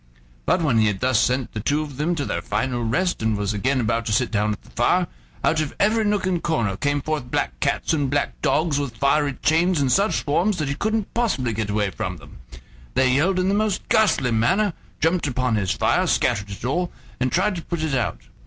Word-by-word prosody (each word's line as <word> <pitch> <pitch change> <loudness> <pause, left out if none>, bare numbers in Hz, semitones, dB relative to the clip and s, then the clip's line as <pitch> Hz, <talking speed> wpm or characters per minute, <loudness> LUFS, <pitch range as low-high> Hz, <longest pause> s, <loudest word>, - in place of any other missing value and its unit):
But 170 - +2
when 125 -8 +3
he 110 - +4
had 100 -2 -1
thus 130 -3 +2
sent 125 +1 0
the 110 - -3
two 145 +8 0
of 145 -4 -9
them 165 +4 0
to 145 -3 -2
their 85 - -2
final 120 +6 -2
rest, 135 +10 0
and 110 -1 +1
was 105 0 -1
again 130 +6 0
about 115 0 0
to - - -1
sit 115 +3 +1
down 105 -1 +1
at 105 - -6
the - - -19
fire, - - +2 0.4
out 155 - +2
of 155 - -4
every 220 +2 +3
nook 205 -2 0
and 180 -3 0
corner 115 - 0
came 145 +6 0
forth 150 -5 -3
black - - -2
cats - - 0
and 145 -4 0
black 145 +1 -1
dogs 155 -2 +1
with 130 -5 -4
fiery 140 +2 +2
chains 165 +2 +3
in 135 -2 +1
such 200 +7 +2
swarms 180 +7 +1
that 150 -3 -2
he - - 0
couldn't 215 +6 -2
possibly 165 - 0
get 110 -1 -3
away 105 -1 0
from 95 -4 -4
them. 70 -5 -15 0.6
They 130 -1 +3
yelled 175 +8 +2
in 185 0 +1
the 195 - +2
most 210 -1 0
ghastly 145 - +3
manner, 185 - +2 0.3
jumped 165 0 +1
upon 125 -2 0
his 100 -3 -1
fire, 100 - +1
scattered 100 0 +1
it 100 +4 -7
all, 175 +7 -1 0.3
and 130 0 0
tried 190 +3 +2
to - - -4
put 170 -1 -4
it 155 -3 -1
out. 120 - -1
140 Hz, 230 wpm, -23 LUFS, 115-170 Hz, 0.6 s, he